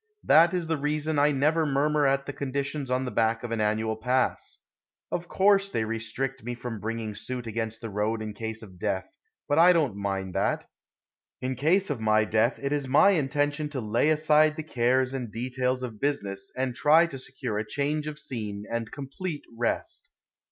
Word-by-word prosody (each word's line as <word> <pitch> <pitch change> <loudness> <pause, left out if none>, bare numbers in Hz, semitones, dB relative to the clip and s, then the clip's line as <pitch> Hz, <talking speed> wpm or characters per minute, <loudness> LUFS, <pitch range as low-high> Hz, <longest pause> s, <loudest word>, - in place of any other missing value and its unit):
That 165 +2 +6
is 175 -2 -1
the 160 0 -1
reason 150 +1 0
I 145 +1 +4
never 150 +4 +2
murmur 145 0 +2
at 135 0 +1
the 145 - -5
conditions 140 0 -3
on 130 +1 0
the 125 - -3
back 115 +1 +1
of 120 - -5
an 115 -1 0
annual 110 +1 0
pass. 125 +3 -1 0.5
Of 175 0 -3
course 200 +1 +3
they 110 - -1
restrict 115 +4 -4
me 120 +1 -4
from 120 -2 -6
bringing 110 0 -4
suit 125 +3 -5
against 110 0 -4
the 115 - -5
road 105 +2 0
in 110 -1 -5
case 110 +1 -5
of 95 -4 -13
death, 100 -2 -2 0.3
but 145 - +2
I 180 +2 +8
don't 150 - +1
mind 95 -2 -3
that. - - 0 0.7
In 130 +1 -2
case 160 +8 +2
of 130 -6 -3
my 110 0 +3
death 110 +3 +2
it 140 0 -2
is 145 -2 -1
my 145 +9 +6
intention 145 -2 0
to 145 -3 -4
lay 115 +6 +1
aside 155 0 +4
the 160 - -5
cares 130 -1 +1
and 125 -5 -4
details 125 +2 -1
of 110 -4 -6
business 100 -9 -2
and 130 -1 -1
try 155 +6 +5
to 140 -6 -7
secure 125 -4 -4
a - - -1
change 150 +2 -1
of 150 -1 -5
scene 105 -8 -5
and 115 -1 -3
complete 145 +3 -5
rest. 115 0 -2
130 Hz, 195 wpm, -27 LUFS, 110-150 Hz, 0.7 s, I